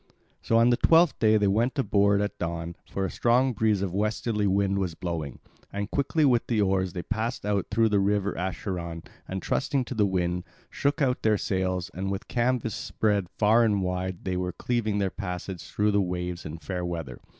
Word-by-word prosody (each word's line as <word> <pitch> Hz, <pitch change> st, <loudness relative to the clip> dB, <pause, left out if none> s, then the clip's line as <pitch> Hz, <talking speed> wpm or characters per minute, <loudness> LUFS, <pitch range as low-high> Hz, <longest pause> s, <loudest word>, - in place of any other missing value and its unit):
So 115 Hz, -, +2 dB
on 115 Hz, +1 st, +5 dB
the 120 Hz, -, +3 dB
twelfth 165 Hz, -1 st, +4 dB
day 110 Hz, -1 st, +5 dB
they 105 Hz, -, +2 dB
went 115 Hz, +8 st, +1 dB
aboard 100 Hz, -6 st, +3 dB
at 105 Hz, -, -3 dB
dawn, 85 Hz, 0 st, -3 dB
for 95 Hz, -, -2 dB
a 90 Hz, -, -3 dB
strong 125 Hz, +2 st, +2 dB
breeze 105 Hz, -2 st, +1 dB
of 95 Hz, -3 st, -3 dB
westerly 105 Hz, +1 st, 0 dB
wind 100 Hz, 0 st, +1 dB
was 90 Hz, -4 st, -2 dB
blowing. 80 Hz, -7 st, -4 dB, 0.3 s
And 100 Hz, +1 st, -4 dB
quickly 145 Hz, +2 st, +1 dB
with 120 Hz, -4 st, +3 dB
the 115 Hz, -3 st, +1 dB
oars 95 Hz, -3 st, +1 dB
they 90 Hz, -, -4 dB
passed 115 Hz, +1 st, -3 dB
out 100 Hz, -3 st, 0 dB
through 115 Hz, +2 st, +3 dB
the 105 Hz, -1 st, +3 dB
river 100 Hz, 0 st, +1 dB
Acheron 85 Hz, -2 st, -4 dB, 0.2 s
and, 95 Hz, 0 st, -4 dB
trusting 135 Hz, -2 st, 0 dB
to -, -, -5 dB
the 105 Hz, -4 st, +2 dB
wind, 90 Hz, -1 st, -1 dB, 0.3 s
shook 145 Hz, +1 st, 0 dB
out 125 Hz, -2 st, +1 dB
their 110 Hz, -1 st, +3 dB
sails, 95 Hz, -2 st, -1 dB
and 95 Hz, +2 st, -3 dB
with 100 Hz, +4 st, -4 dB
canvas 120 Hz, -2 st, 0 dB
spread 100 Hz, -3 st, 0 dB
far 110 Hz, +2 st, +5 dB
and 105 Hz, -4 st, +2 dB
wide 90 Hz, 0 st, -3 dB
they 90 Hz, -1 st, -1 dB
were 90 Hz, -1 st, -2 dB
cleaving 115 Hz, -4 st, -1 dB
their 100 Hz, -2 st, 0 dB
passage 90 Hz, -2 st, -5 dB
through 105 Hz, 0 st, +1 dB
the 100 Hz, 0 st, +3 dB
waves 90 Hz, -2 st, -3 dB
in 75 Hz, +2 st, -6 dB
fair 90 Hz, +2 st, -4 dB
weather. 80 Hz, -8 st, -5 dB
100 Hz, 200 wpm, -27 LUFS, 90-110 Hz, 0.3 s, on